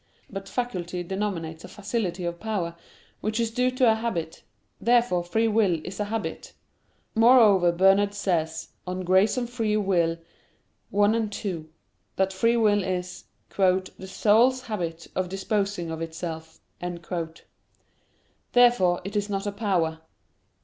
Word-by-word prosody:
But 195 Hz, -1 st, -6 dB
faculty 180 Hz, -8 st, -3 dB
denominates 175 Hz, -4 st, -4 dB
a -, -, -8 dB
facility 200 Hz, -4 st, -3 dB
of 170 Hz, 0 st, -4 dB
power, 195 Hz, -7 st, -3 dB, 0.4 s
which 215 Hz, +2 st, -2 dB
is 230 Hz, -1 st, 0 dB
due 250 Hz, +2 st, +2 dB
to 255 Hz, -2 st, +3 dB
a -, -, +4 dB
habit. 205 Hz, -8 st, -3 dB, 0.4 s
Therefore 235 Hz, -7 st, +3 dB
free 225 Hz, +6 st, +1 dB
will 210 Hz, -6 st, +2 dB
is 190 Hz, +2 st, -7 dB
a 210 Hz, -, 0 dB
habit. 220 Hz, +1 st, -4 dB, 0.6 s
Moreover 220 Hz, -6 st, +6 dB
Bernard 195 Hz, +3 st, +3 dB
says 160 Hz, -5 st, -1 dB, 0.2 s
(De 180 Hz, -, -2 dB
Gratia 190 Hz, +7 st, +3 dB
et 240 Hz, +1 st, -9 dB
Lib. 210 Hz, -2 st, +1 dB
Arb. 170 Hz, -3 st, +1 dB, 0.7 s
1,2) 205 Hz, -5 st, 0 dB, 0.5 s
that 190 Hz, 0 st, +1 dB
free 230 Hz, +5 st, +2 dB
will 205 Hz, -3 st, +3 dB
is 180 Hz, -1 st, -4 dB, 0.3 s
"the 190 Hz, 0 st, +1 dB
soul's 230 Hz, +6 st, +3 dB
habit 170 Hz, -8 st, -4 dB
of 185 Hz, -1 st, -1 dB
disposing 195 Hz, -3 st, -2 dB
of 160 Hz, 0 st, -5 dB
itself." 160 Hz, -1 st, -6 dB, 2.0 s
Therefore 240 Hz, -8 st, +4 dB
it 200 Hz, +2 st, -6 dB
is 205 Hz, 0 st, 0 dB
not 195 Hz, 0 st, -2 dB
a 205 Hz, -, -1 dB
power. 185 Hz, -6 st, 0 dB
195 Hz, 130 wpm, -26 LUFS, 175-220 Hz, 2.0 s, Moreover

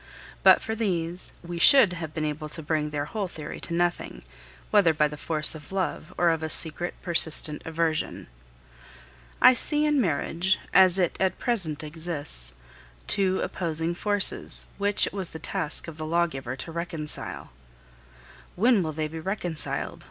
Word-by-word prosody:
But -, -, +6 dB
for 220 Hz, -, -3 dB
these, 180 Hz, -5 st, -1 dB
we 170 Hz, 0 st, -6 dB
should 230 Hz, -2 st, +6 dB
have 165 Hz, -3 st, -6 dB
been 155 Hz, -1 st, -3 dB
able 150 Hz, 0 st, -5 dB
to 160 Hz, +1 st, -8 dB
bring 150 Hz, 0 st, -1 dB
their 145 Hz, -1 st, -3 dB
whole 200 Hz, +5 st, -4 dB
theory 160 Hz, -4 st, -8 dB
to 170 Hz, -, -7 dB
nothing, 175 Hz, 0 st, -2 dB, 0.5 s
whether 185 Hz, -7 st, +4 dB
by 150 Hz, 0 st, +2 dB
the 150 Hz, -, -8 dB
force 155 Hz, +1 st, +2 dB
of 155 Hz, 0 st, -12 dB
love 185 Hz, -3 st, -3 dB
or 175 Hz, -1 st, +3 dB
of 165 Hz, -1 st, -2 dB
a 160 Hz, -, -4 dB
secret, 165 Hz, +3 st, +1 dB
persistent 160 Hz, -3 st, +2 dB
aversion. 160 Hz, -1 st, -2 dB, 1.2 s
I 255 Hz, -, +9 dB
see 295 Hz, +4 st, -1 dB
in 295 Hz, -2 st, +2 dB
marriage, 175 Hz, +1 st, 0 dB, 0.2 s
as 185 Hz, -1 st, +5 dB
it 180 Hz, -3 st, 0 dB
at 190 Hz, -1 st, 0 dB
present 175 Hz, -, -1 dB
exists, 150 Hz, -, -2 dB, 0.5 s
two 190 Hz, -1 st, +3 dB
opposing 165 Hz, -1 st, -2 dB
forces 205 Hz, +2 st, +4 dB
which 205 Hz, 0 st, +2 dB
it -, -, -6 dB
was 190 Hz, -3 st, -3 dB
the -, -, -9 dB
task 160 Hz, -1 st, -3 dB
of 160 Hz, -2 st, -9 dB
the 155 Hz, -, -5 dB
lawgiver 155 Hz, -7 st, -1 dB
to 135 Hz, +5 st, -8 dB
reconcile. 165 Hz, -2 st, -5 dB, 1.0 s
"When 225 Hz, +2 st, +3 dB
will 160 Hz, -2 st, -3 dB
they 155 Hz, 0 st, -3 dB
be 160 Hz, +1 st, -8 dB
reconciled?" 175 Hz, -2 st, -3 dB
170 Hz, 160 wpm, -25 LUFS, 155-190 Hz, 1.2 s, I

